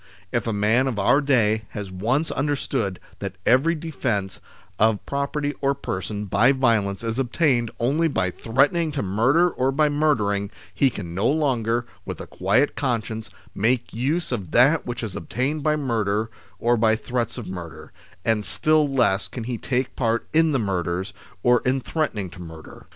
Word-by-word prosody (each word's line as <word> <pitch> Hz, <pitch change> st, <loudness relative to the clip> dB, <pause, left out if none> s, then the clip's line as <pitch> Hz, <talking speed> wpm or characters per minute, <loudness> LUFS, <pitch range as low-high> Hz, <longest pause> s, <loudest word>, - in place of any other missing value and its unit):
If -, -, -1 dB
a -, -, +1 dB
man 110 Hz, +5 st, +2 dB
of 125 Hz, -5 st, -2 dB
our 125 Hz, +8 st, +4 dB
day 110 Hz, -6 st, +2 dB
has 100 Hz, -2 st, -5 dB
once 120 Hz, -, 0 dB
understood 135 Hz, -8 st, -1 dB, 0.2 s
that -, -, -5 dB
every 140 Hz, +8 st, +4 dB
defence 125 Hz, -, -3 dB, 0.4 s
of 110 Hz, -1 st, +2 dB
property 145 Hz, +1 st, -2 dB
or 140 Hz, 0 st, +2 dB
person 105 Hz, -4 st, -4 dB
by 110 Hz, +7 st, +4 dB
violence 115 Hz, -6 st, +1 dB
is 115 Hz, +2 st, -2 dB
obtained 125 Hz, -2 st, +1 dB
only 145 Hz, +8 st, +2 dB
by 95 Hz, -, 0 dB
threatening 145 Hz, -, +1 dB
to 140 Hz, -, -2 dB
murder 120 Hz, -, +3 dB
or 130 Hz, +1 st, 0 dB
by 150 Hz, +2 st, +2 dB
murdering, 110 Hz, -10 st, +1 dB, 0.2 s
he 135 Hz, +8 st, +3 dB
can 90 Hz, -8 st, -7 dB
no 100 Hz, +6 st, +1 dB
longer, 120 Hz, -6 st, +1 dB, 0.2 s
with -, -, -6 dB
a -, -, -6 dB
quiet 100 Hz, +10 st, +1 dB
conscience, 115 Hz, -4 st, -2 dB, 0.2 s
make 120 Hz, +4 st, 0 dB
use 145 Hz, +9 st, -1 dB
of 100 Hz, -9 st, -3 dB
that 140 Hz, +6 st, +4 dB
which 120 Hz, 0 st, -4 dB
is 105 Hz, -4 st, -5 dB
obtained 135 Hz, +8 st, -2 dB
by 150 Hz, +1 st, +2 dB
murder 110 Hz, -6 st, -1 dB, 0.3 s
or 120 Hz, +1 st, +2 dB
by 110 Hz, 0 st, +3 dB
threats 120 Hz, 0 st, -3 dB
of 115 Hz, -6 st, -6 dB
murder, 85 Hz, -3 st, -8 dB, 0.3 s
and 110 Hz, -2 st, +2 dB
still 155 Hz, +8 st, +2 dB
less 120 Hz, -7 st, +2 dB
can 120 Hz, -, -6 dB
he 120 Hz, -1 st, -4 dB
take 130 Hz, 0 st, -2 dB
part 115 Hz, -2 st, 0 dB
in 160 Hz, 0 st, +4 dB
the 140 Hz, -, +2 dB
murders, 95 Hz, -2 st, -2 dB, 0.3 s
or 125 Hz, -1 st, +4 dB
in 130 Hz, +1 st, +1 dB
threaten 155 Hz, -2 st, -2 dB
ing 95 Hz, -4 st, -4 dB
to 90 Hz, -, -12 dB
murder. 80 Hz, -2 st, -11 dB
120 Hz, 175 wpm, -23 LUFS, 105-140 Hz, 0.4 s, our